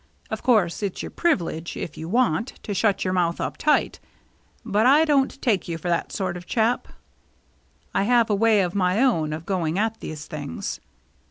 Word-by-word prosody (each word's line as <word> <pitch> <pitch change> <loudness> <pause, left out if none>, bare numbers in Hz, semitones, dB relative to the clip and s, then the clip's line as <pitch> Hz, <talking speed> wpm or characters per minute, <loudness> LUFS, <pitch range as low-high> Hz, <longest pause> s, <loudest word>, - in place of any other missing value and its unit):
Of - - -3
course 210 -9 +2
it's 200 -3 -3
your - - -6
privilege, 170 - -1
if 155 - -5
you 160 - -7
want, 230 -1 +1
to 205 - -3
shut 205 0 +1
your 185 - 0
mouth 170 -2 +1
up - - -3
tight. 300 0 +1 0.7
But 215 +4 +2
I 295 +4 +6
don't 275 -3 +1
take 215 -7 +1
you 165 -1 -3
for 175 +2 -4
that 170 - 0
sort 190 -3 -2
of 180 - -6
a - - -28
chap. 230 +1 +1 1.1
I - - +2
have 235 0 +4
a 210 - +1
way 220 0 +4
of 180 -2 -1
my 185 +1 +1
own 190 - +2
of 155 +2 -5
going 175 -3 -1
at 225 +2 0
these 155 0 -7
things. 145 - -5
195 Hz, 195 wpm, -24 LUFS, 170-230 Hz, 1.1 s, I